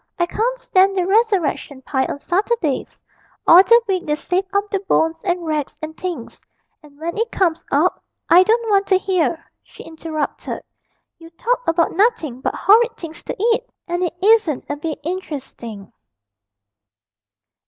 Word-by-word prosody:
I 345 - +2
can't 470 +7 -1
stand 390 -5 +2
the 360 - +1
resurrection 380 - 0
pie 265 0 0
on - - -4
Saturdays 360 - -2 0.4
all 345 +2 +9
the 465 +4 +6
week 370 -3 -1
they 300 - +1
save 360 +5 -1
up 400 +1 0
the 395 - 0
bones 325 -4 0
and 355 -2 -1
rags 300 -2 -2
and 315 0 -7
things, 345 -11 -6 0.4
and 290 -2 -18
when 335 +2 -4
it 460 +1 -1
comes 335 -4 0
up - - +1
' - - -56
'I 350 - +9
don't 450 +4 +2
want 395 -1 +3
to 380 - +4
hear,' 355 -4 -1 0.2
she - - -14
interrupted; 320 -2 -5 0.6
'you 330 0 -13
talk - - -2
about 330 0 +2
nothing 335 - +1
but - - -2
horrid 455 +3 +4
things 330 -1 -9
to - - -4 0.2
eat, 475 +2 -2 0.2
and 350 0 -2
it 350 -1 -1
isn't 415 - +3
a 290 - -3
bit 305 +1 -4
interesting.' 275 - -7
350 Hz, 165 wpm, -20 LUFS, 315-400 Hz, 0.6 s, all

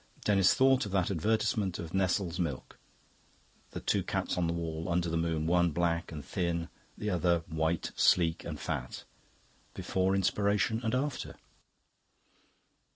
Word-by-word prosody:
Denis 95 -3 +4
thought 130 -3 +4
of - - -7
that 95 -1 +1
advertisement 100 +1 0
of 85 0 -7
Nestle's 95 -2 0
milk 75 -8 -4 0.9
the - - -6
two - - +1
cats - - -2
on 90 -2 0
the 85 - 0
wall, 80 -1 -4
under 85 -1 0
the - - -1
moon, 80 -1 0
one 85 +1 +3
black 85 +1 -1
and 75 -4 -7
thin, 85 -2 -2 0.3
the 105 0 -2
other 85 -1 +1
white, 80 0 -1
sleek, 80 -3 +3
and - - -6
fat. - - -4 0.7
Before 95 +1 0
Inspiration 100 +3 +1
and 110 +1 0
after. 140 +1 -3
85 Hz, 145 wpm, -31 LUFS, 85-100 Hz, 0.9 s, Denis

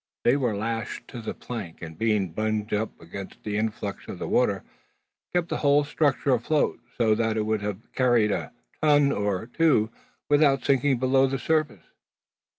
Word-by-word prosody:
They 120 - +4
were 125 -7 0
lashed 115 +2 -4
to 120 - -7
the 110 - -5
plank; 105 -9 -7
and 80 -1 -7
being 105 -2 +1
bunged 110 +3 -2
up 105 +1 -2
against 95 +4 -9
the 105 -1 -3
influx 105 -2 -3
of - - -6
the - - -4
water, - - +2 0.7
kept 175 -1 0
the - - -1
whole 145 0 +4
structure 145 -2 +1
afloat, 135 +6 +1 0.2
so 110 -3 +3
that 110 0 0
it 110 - +1
would 110 -1 0
have 105 +1 -6
carried 120 -5 +3
a - - -3 0.3
ton 145 -2 +4
or 100 -3 -1
two 120 -5 +2 0.4
without 145 -2 +3
sinking 135 -1 +3
below 130 +2 +3
the 135 +1 -1
surface. 150 - 0
115 Hz, 170 wpm, -26 LUFS, 105-140 Hz, 0.7 s, They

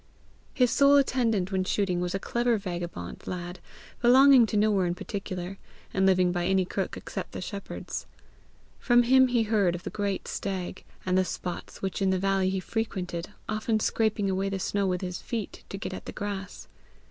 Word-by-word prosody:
His 250 -3 +3
sole 280 0 +6
attendant 230 -9 +2
when 190 -1 +1
shooting 185 -2 0
was 180 +1 -2
a - - -1
clever 240 +2 +1
vagabond 175 - -5
lad 175 0 -5 0.4
belonging 255 0 +7
to 210 - -1
nowhere 205 -3 +3
in 175 - -1
particular, 190 -1 -5 0.3
and 190 0 +3
living 185 -1 +4
by 175 0 -1
any 190 -1 +3
crook - - -3
except - - -6
the - - -5
shepherd's. 200 -2 -6 0.7
From 240 -1 +4
him 260 +2 +6
he 240 -2 +2
heard 205 -5 +2
of 175 - -8
the - - -5
great 200 -2 -2
stag, 185 -2 -4 0.2
and 185 0 +3
the - - +4
spots 180 0 -6
which 190 +1 -2
in 195 - +3
the 190 - +2
valleys 195 0 +1
he 190 - 0
frequented, 185 -4 -3 0.2
often 215 +1 0
scraping 215 -2 +1
away 195 +1 0
the 195 - -2
snow 200 +1 0
with 180 -1 -1
his 180 -1 -4
feet 225 -5 -5
to 195 - -5
get 195 -2 -5
at - - -7
the - - -4
grass. 195 -2 -5
195 Hz, 185 wpm, -28 LUFS, 185-220 Hz, 0.7 s, belonging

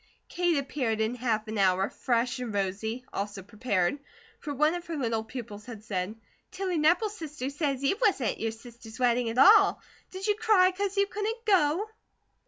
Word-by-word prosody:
Kate 350 -2 +1
appeared 260 -5 -1
in 220 +2 0
half 230 -3 -1
an 215 -1 -3
hour, 190 0 +3
fresh 240 -1 0
and 245 -3 -4
rosy, 205 +5 -2
also 200 -1 -4
prepared; 205 +2 -1 0.4
for 295 - -6
one 300 +3 +2
of 350 0 -6
her 330 -2 -4
little 230 -4 -1
pupils 220 -3 -8
had 225 -4 -9
said: 195 -1 -3 0.3
"Tilly 370 -3 -2
Nepple's 355 +8 +2
sister 300 - -5
say 285 -1 -1
you 275 - -1
wasn't 390 - +2
at - - -9
your 225 - -1
sister's 225 -1 -12
wedding 245 -2 +2
at 225 - -5
all. 400 +8 +7 0.3
Did 375 +1 -6
you 420 - +3
cry 410 -3 +4
'cause 400 +1 -2
you 400 - +4
couldn't 430 +3 -4
go?" 375 -1 +3
255 Hz, 185 wpm, -28 LUFS, 220-355 Hz, 0.4 s, all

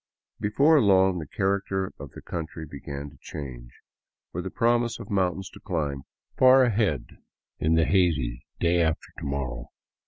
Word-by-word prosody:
Before 140 +9 +4
long 95 -3 +4
the 75 - -6
character 95 +1 -1
of 70 -1 -9
the - - -11
country 80 -1 -5
began 70 0 -7
to 75 - -19
change, 65 -6 -8 0.6
with 90 +2 -3
a - - -3
promise 120 +1 +1
of - - -9
mountains 95 -1 0
to - - -13
climb 75 -8 -3 0.3
far 130 +1 +7
ahead 105 - +1 0.5
in 80 +1 +2
the 80 -1 +4
hazy 75 -12 +1 0.2
day 85 0 +3
after 80 -1 -1
to - - -9
morrow. 70 -3 -3
85 Hz, 155 wpm, -26 LUFS, 70-100 Hz, 0.6 s, far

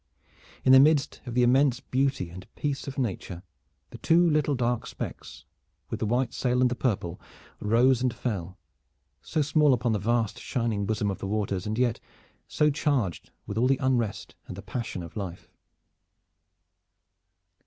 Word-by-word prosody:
In 130 - +6
the 130 - +9
midst 150 0 +3
of 120 - -5
the 125 - +4
immense 130 +1 +4
beauty 135 -10 -1
and 95 +2 -10
peace 140 -2 -3
of 140 - -6
nature 95 -7 -3 0.5
the - - -10
two 170 +2 +4
little 150 -2 +2
dark 120 -2 -1
specks - - -8 0.5
with - - -3
the 110 - -1
white 120 +2 0
sail 125 -1 0
and 125 -1 +3
the - - 0
purple 100 -9 -2 0.4
rose 120 +4 +3
and 125 -1 +1
fell, 100 -7 -4 0.6
so 155 -2 -1
small 150 -2 +4
upon 120 0 -1
the 105 - 0
vast 115 +1 0
shining 115 -5 -2
bosom 105 -2 0
of 95 - -6
the - - -4
waters, 100 -2 -2
and 110 +1 -2
yet 120 -2 +1 0.5
so 150 0 +2
charged 135 - -1 0.2
with 105 +2 -3
all 125 - +3
the 135 0 +3
unrest 120 -6 -1
and - - -8
the - - -8
passion 115 -7 -4
of 85 - -11
life. 95 -5 -6
120 Hz, 165 wpm, -27 LUFS, 105-135 Hz, 0.6 s, the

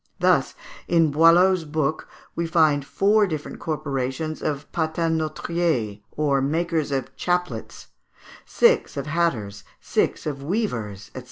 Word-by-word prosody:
Thus, - - +2 0.3
in 165 -3 +3
Boileau's 170 +4 +5
book, 155 -1 -2 0.3
we 170 0 -1
find 155 -4 +3
four 205 +7 +2
different 155 -4 -5
corporations 145 0 -3
of 145 -1 -2
patenôtriers, 160 -7 -1
or 140 -2 +1
makers 160 +1 -1
of 135 -2 -3
chaplets, 180 0 -3 0.5
six 470 - +2
of 140 - -3
hatters, 125 -12 -1 0.2
six - - -1
of 145 -3 -4
weavers, 125 - -3
&c. - - -4
155 Hz, 115 wpm, -23 LUFS, 140-170 Hz, 0.5 s, Boileau's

